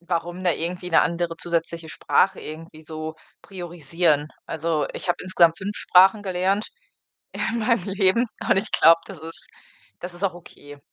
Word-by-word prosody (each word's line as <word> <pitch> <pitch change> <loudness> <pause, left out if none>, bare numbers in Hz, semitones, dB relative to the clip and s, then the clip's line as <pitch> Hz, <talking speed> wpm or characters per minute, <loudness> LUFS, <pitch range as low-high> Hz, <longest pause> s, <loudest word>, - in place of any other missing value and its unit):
warum 175 +1 -3
da 180 - +3
irgendwie 175 +3 -4
'ne - - +5
andere 170 0 -1
zusätzliche 165 -1 -2
Sprache 190 - +1
irgendwie 155 0 -9
so 155 0 -6 0.3
priorisieren. 165 -4 -1 0.2
Also, 160 -2 -1
ich - - -6
habe 175 - +2
insgesamt 170 -3 +3
5 200 +2 -4
Sprachen 190 +3 +5
gelernt 190 +2 0 0.7
in 235 - -2
meinem 230 -4 +1
Leben 195 +4 +3 0.2
und - - +4
ich 200 +3 0
glaube, 165 +1 +6
das 195 - -9
ist 165 +1 -3 0.5
das 175 0 -7
ist 175 - -10
auch 190 -3 0
okay. 145 -4 -13
175 Hz, 160 wpm, -23 LUFS, 165-190 Hz, 0.7 s, glaube